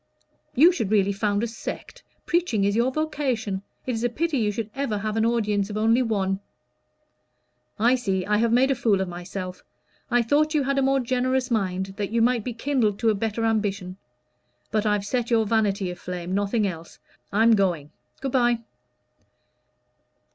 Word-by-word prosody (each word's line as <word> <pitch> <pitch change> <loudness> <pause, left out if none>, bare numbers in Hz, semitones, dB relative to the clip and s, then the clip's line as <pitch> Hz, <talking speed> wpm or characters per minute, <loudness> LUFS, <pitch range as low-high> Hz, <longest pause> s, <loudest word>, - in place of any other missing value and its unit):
"You 320 +8 +7
should 225 - -2
really 200 -2 +3
found 205 +1 0
a - - 0
sect. 235 - -7 0.2
Preaching 335 - +1
is 200 +1 +1
your 240 +3 +2
vocation. 260 -10 -2 0.2
It 255 - -1
is 225 -1 -3
a 245 - +2
pity 300 +3 -1
you 210 -2 +1
should 220 0 -5
ever 270 -6 -2
have 215 +1 -3
an 225 0 +2
audience 210 -4 0
of 210 - -4
only 225 +3 +3
one." 195 -5 0 1.4
"I 235 +3 +4
see 195 -7 -1
I 210 0 +2
have 230 +1 +2
made 255 +3 +4
a - - +4
fool 225 -6 +1
of 190 - -1
myself. 180 +1 -6 0.5
I 245 -1 +3
thought 305 +6 +2
you 295 - +3
had 275 +1 0
a - - +2
more 270 0 +3
generous 255 +1 0
mind 190 -3 -1
that 205 -2 -2
you 230 - 0
might 235 -1 +2
be 250 - -3
kindled 230 -5 0
to 225 +1 +2
a - - +1
better 225 +2 -2
ambition. 200 -4 -1 0.7
But 215 0 +1
I've 210 -1 +1
set 240 +2 -1
your 225 -2 +3
vanity 200 -4 +1
aflame 180 0 -6
nothing 205 +2 +1
else. 170 -3 -6 0.3
I'm 225 +3 +4
going. 175 -8 +1 0.3
Good 270 - -2
bye." 240 -2 +2
220 Hz, 180 wpm, -25 LUFS, 200-245 Hz, 1.4 s, You